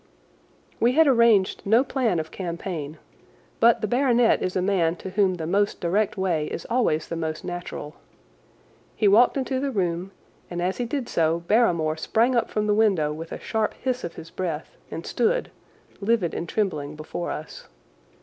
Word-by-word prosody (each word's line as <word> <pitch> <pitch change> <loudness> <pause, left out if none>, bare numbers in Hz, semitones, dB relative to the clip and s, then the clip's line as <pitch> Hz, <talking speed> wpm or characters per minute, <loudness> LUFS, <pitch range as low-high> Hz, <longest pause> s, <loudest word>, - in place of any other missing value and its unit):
We 240 +2 +3
had 320 +3 +5
arranged 235 -7 +4
no 225 +5 +4
plan 255 -9 0
of 160 0 -5
campaign, 170 -4 -5 0.6
but 235 0 +5
the 215 - 0
baronet 245 0 +3
is 185 - -2
a - - +2
man 175 -4 +2
to 190 +2 -8
whom 190 -1 +2
the 165 -2 -5
most 200 +5 +1
direct 200 +4 0
way 170 -5 0
is - - -6
always 195 -11 +1
the 170 - -4
most 160 -1 -4
natural. 175 -4 -6 1.0
He 210 - +2
walked 230 +7 +5
into 260 -1 -1
the 280 +1 -1
room, 180 -5 -1 0.4
and 175 - -4
as 180 +2 -1
he 245 - -1
did 245 0 -3
so 165 +1 +1
Barrymore 170 -6 +2
sprang 235 +9 +1
up 235 - +1
from 210 0 -1
the 210 - +2
window 195 -9 +2
with 165 +2 -8
a - - -5
sharp 220 -1 -1
hiss 255 -1 -2
of 170 - -5
his 165 - -10
breath 165 -4 -4
and 165 - -6
stood, - - 0 0.5
livid 205 -4 +1
and 170 - -4
trembling, 155 -9 -2
before 155 +3 -5
us. 155 - -7
190 Hz, 180 wpm, -24 LUFS, 165-230 Hz, 1.0 s, had